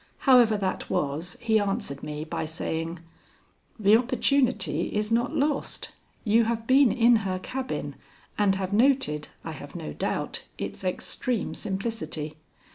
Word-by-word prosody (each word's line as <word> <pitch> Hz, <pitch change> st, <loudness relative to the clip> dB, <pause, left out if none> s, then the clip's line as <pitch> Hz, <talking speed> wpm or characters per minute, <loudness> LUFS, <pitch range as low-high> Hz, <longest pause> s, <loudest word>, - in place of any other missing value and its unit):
However 245 Hz, -5 st, +6 dB
that 195 Hz, -2 st, -2 dB
was, 150 Hz, +5 st, -1 dB
he 220 Hz, -2 st, +3 dB
answered 195 Hz, -9 st, -2 dB
me 150 Hz, 0 st, -5 dB
by 155 Hz, -, -3 dB
saying: 165 Hz, +1 st, -3 dB, 0.8 s
"The 210 Hz, 0 st, +6 dB
opportunity 255 Hz, +2 st, +1 dB
is 210 Hz, +1 st, 0 dB
not 240 Hz, +6 st, +1 dB
lost. 290 Hz, -1 st, -1 dB, 0.3 s
You 225 Hz, +1 st, +4 dB
have 225 Hz, 0 st, -1 dB
been 260 Hz, -1 st, +5 dB
in 235 Hz, 0 st, +5 dB
her 190 Hz, -3 st, -2 dB
cabin 260 Hz, +7 st, -4 dB, 0.4 s
and 200 Hz, -2 st, +3 dB
have 190 Hz, 0 st, -3 dB
noted, 235 Hz, -, +2 dB, 0.2 s
I -, -, -5 dB
have -, -, -10 dB
no 75 Hz, -, -5 dB
doubt, -, -, -2 dB
its -, -, -5 dB
extreme 215 Hz, +5 st, -2 dB
simplicity. 190 Hz, -7 st, -4 dB
215 Hz, 135 wpm, -27 LUFS, 180-245 Hz, 0.8 s, However